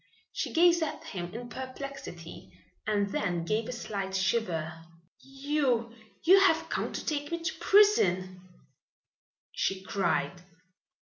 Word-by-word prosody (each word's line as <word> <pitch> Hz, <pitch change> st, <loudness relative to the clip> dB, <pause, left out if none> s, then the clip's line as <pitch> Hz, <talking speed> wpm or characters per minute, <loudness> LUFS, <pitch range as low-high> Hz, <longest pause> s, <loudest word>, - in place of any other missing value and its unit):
She -, -, -3 dB
gazed 345 Hz, 0 st, +5 dB
at 315 Hz, -, -3 dB
him 175 Hz, -2 st, -6 dB
in 240 Hz, +1 st, -6 dB
perplexity 265 Hz, +2 st, -8 dB, 0.4 s
and 205 Hz, -2 st, +1 dB
then 175 Hz, -4 st, -1 dB
gave 215 Hz, +5 st, -1 dB
a -, -, -2 dB
slight 200 Hz, -5 st, -4 dB
shiver. 175 Hz, -5 st, -1 dB, 0.4 s
"You 270 Hz, -4 st, -1 dB, 0.3 s
you 375 Hz, +4 st, +7 dB
have 325 Hz, -4 st, +3 dB
come -, -, -2 dB
to -, -, -5 dB
take 290 Hz, -2 st, -2 dB
me 335 Hz, 0 st, -3 dB
to 325 Hz, -, -1 dB
prison," 185 Hz, -, +4 dB, 1.1 s
she 190 Hz, 0 st, -1 dB
cried. 190 Hz, -2 st, -1 dB
235 Hz, 125 wpm, -29 LUFS, 190-300 Hz, 1.1 s, you